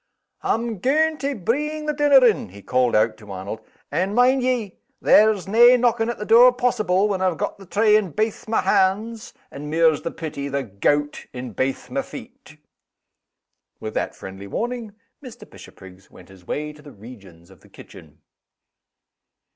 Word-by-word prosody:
"Am 225 Hz, -2 st, -2 dB
gaun' 310 Hz, -, +1 dB
to 280 Hz, 0 st, -2 dB
breeng 300 Hz, -, -2 dB
the 300 Hz, -, -1 dB
dinner 285 Hz, -3 st, +5 dB
in!" 220 Hz, -, +1 dB
he 100 Hz, +2 st, -14 dB
called 125 Hz, -1 st, +1 dB
out 110 Hz, +1 st, +2 dB
to 105 Hz, -2 st, -13 dB
Arnold. 95 Hz, +3 st, -6 dB, 0.3 s
"And, 185 Hz, +7 st, -1 dB
mind 255 Hz, +2 st, +4 dB
ye, 245 Hz, -6 st, -2 dB, 0.2 s
there's 210 Hz, -3 st, +4 dB
nae 240 Hz, +5 st, +6 dB
knocking 235 Hz, -2 st, +1 dB
at 240 Hz, -, -4 dB
the 210 Hz, -, -6 dB
door 235 Hz, +3 st, +7 dB
possible, 215 Hz, -6 st, +1 dB
when 195 Hz, -3 st, -2 dB
I've 185 Hz, -3 st, 0 dB
got -, -, -4 dB
the 195 Hz, -, -14 dB
tray 210 Hz, +3 st, +3 dB
in 210 Hz, -4 st, +1 dB
baith 215 Hz, +7 st, -3 dB
my 220 Hz, -, +1 dB
hands, 215 Hz, +5 st, 0 dB, 0.2 s
and 145 Hz, +2 st, -8 dB
mairs 160 Hz, -1 st, +2 dB
the -, -, -4 dB
pity, 145 Hz, -4 st, -6 dB
the 140 Hz, 0 st, -2 dB
gout 145 Hz, +8 st, -1 dB
in 125 Hz, -2 st, -7 dB
baith 130 Hz, +6 st, -3 dB
my -, -, -1 dB
feet." -, -, -12 dB, 1.2 s
With 110 Hz, -, -6 dB
that -, -, -3 dB
friendly 95 Hz, +1 st, -10 dB
warning, 230 Hz, -, -4 dB, 0.3 s
Mr. 250 Hz, -4 st, -11 dB
Bishopriggs 95 Hz, 0 st, -15 dB
went 90 Hz, -, -17 dB
his 95 Hz, -2 st, -18 dB
way 150 Hz, 0 st, -4 dB
to 150 Hz, -, -17 dB
the 145 Hz, -, -13 dB
regions 95 Hz, -7 st, -15 dB
of 95 Hz, -, -18 dB
the -, -, -22 dB
kitchen. -, -, -15 dB
195 Hz, 170 wpm, -22 LUFS, -, 1.2 s, door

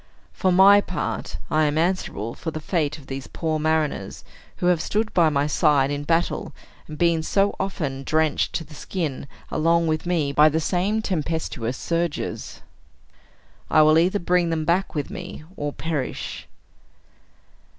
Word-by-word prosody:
For 185 Hz, -, +1 dB
my 195 Hz, +3 st, +7 dB
part, 75 Hz, -, -4 dB
I 155 Hz, 0 st, +3 dB
am 150 Hz, +1 st, 0 dB
answerable 160 Hz, -, -1 dB
for 165 Hz, -, -5 dB
the 155 Hz, -, -5 dB
fate 155 Hz, -2 st, -1 dB
of 145 Hz, -, -14 dB
these 135 Hz, 0 st, -6 dB
poor 160 Hz, -2 st, -2 dB
mariners, 155 Hz, -10 st, -1 dB, 0.3 s
who -, -, -3 dB
have 175 Hz, -2 st, +3 dB
stood 215 Hz, +1 st, -1 dB
by 170 Hz, -3 st, +4 dB
my 140 Hz, -1 st, +1 dB
side 145 Hz, -2 st, +3 dB
in 145 Hz, 0 st, -3 dB
battle, 165 Hz, +2 st, 0 dB, 0.3 s
and 155 Hz, -, -8 dB
been 170 Hz, -1 st, +2 dB
so 195 Hz, +5 st, +1 dB
often 155 Hz, -9 st, -3 dB
drenched 155 Hz, +1 st, +1 dB
to 165 Hz, -, -2 dB
the 155 Hz, -, -15 dB
skin, 150 Hz, -4 st, -4 dB, 0.2 s
along 165 Hz, +2 st, +2 dB
with 155 Hz, +1 st, -1 dB
me, 160 Hz, -5 st, +1 dB
by 150 Hz, +2 st, +6 dB
the 160 Hz, +2 st, 0 dB
same 195 Hz, +7 st, 0 dB
tempestuous 155 Hz, -, -2 dB
surges. 170 Hz, -1 st, -3 dB, 1.1 s
I 155 Hz, -, +6 dB
will 155 Hz, +1 st, +6 dB
either 185 Hz, +4 st, +2 dB
bring 175 Hz, -2 st, +1 dB
them 160 Hz, -1 st, -1 dB
back 175 Hz, +2 st, 0 dB
with 150 Hz, +5 st, -3 dB
me, 180 Hz, -5 st, -7 dB
or 145 Hz, -3 st, -3 dB
perish." 150 Hz, -4 st, -4 dB
160 Hz, 160 wpm, -23 LUFS, 150-175 Hz, 1.1 s, my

